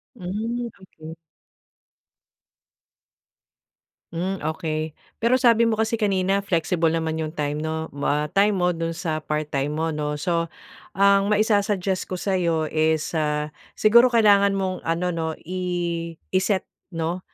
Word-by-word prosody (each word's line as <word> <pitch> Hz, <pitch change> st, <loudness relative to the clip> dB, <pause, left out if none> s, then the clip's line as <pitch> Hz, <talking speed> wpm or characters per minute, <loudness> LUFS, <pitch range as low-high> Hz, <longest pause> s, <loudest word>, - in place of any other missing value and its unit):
Mhm, 230 Hz, +5 st, -3 dB
okey. 160 Hz, -3 st, -11 dB, 3.0 s
Mhm, 180 Hz, +3 st, -2 dB, 0.2 s
okey. 155 Hz, -2 st, -3 dB, 0.2 s
Pero 235 Hz, +2 st, +3 dB
sabi 235 Hz, -2 st, +4 dB
mo 225 Hz, -, +2 dB
kasi 220 Hz, +1 st, 0 dB
kanina 195 Hz, -2 st, +1 dB
flexible 170 Hz, -3 st, 0 dB
naman 160 Hz, 0 st, -1 dB
'yong 155 Hz, 0 st, -4 dB
time 150 Hz, 0 st, -2 dB
'no 160 Hz, +1 st, -3 dB
mwa 145 Hz, +1 st, -1 dB
time 200 Hz, +1 st, +3 dB
mo 180 Hz, -1 st, +2 dB
do'n 165 Hz, -1 st, -3 dB
sa 160 Hz, -2 st, -2 dB
part 150 Hz, 0 st, -3 dB
time 140 Hz, +2 st, -1 dB
mo 160 Hz, +1 st, -1 dB
'no? 150 Hz, -1 st, -2 dB
So 170 Hz, +2 st, -1 dB, 0.5 s
ang 200 Hz, 0 st, +4 dB
maisasuggest 205 Hz, -3 st, +1 dB
ko 185 Hz, -, -4 dB
sa 190 Hz, +1 st, -1 dB
iyo 165 Hz, -3 st, 0 dB
is, 155 Hz, 0 st, +1 dB
ah, 150 Hz, -2 st, -1 dB, 0.2 s
siguro 235 Hz, +4 st, +6 dB
kailangan 205 Hz, -4 st, +4 dB
mong 190 Hz, -1 st, -2 dB
ano 170 Hz, +2 st, 0 dB
'no, 160 Hz, -2 st, -2 dB
i 175 Hz, -2 st, -3 dB, 0.2 s
iset 190 Hz, +1 st, +1 dB, 0.3 s
'no? 165 Hz, +2 st, -2 dB
175 Hz, 135 wpm, -23 LUFS, 160-200 Hz, 3.0 s, siguro